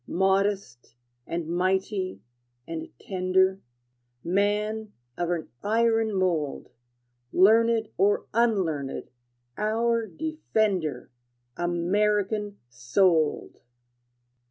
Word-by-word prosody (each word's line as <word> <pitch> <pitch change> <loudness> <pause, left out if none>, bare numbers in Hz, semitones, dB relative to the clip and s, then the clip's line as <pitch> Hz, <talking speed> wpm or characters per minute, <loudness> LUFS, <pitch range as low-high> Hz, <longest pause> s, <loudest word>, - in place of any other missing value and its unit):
Modest, 190 - 0 0.3
and 170 -1 -3
mighty, 185 - -1 0.4
and 165 -1 -5
tender, 190 0 +1 0.6
Man 210 +3 0 0.2
of 175 -1 -2
an 170 -2 -2
iron 225 0 +2
mold, 170 -7 -1 0.6
Learned 225 +3 +4
or 205 +1 +2
unlearned, 190 - 0 0.5
our 230 +1 +1
defender, 205 - -2 0.4
American 205 +4 0
souled! 150 +7 +1
195 Hz, 70 wpm, -26 LUFS, 175-215 Hz, 0.6 s, Learned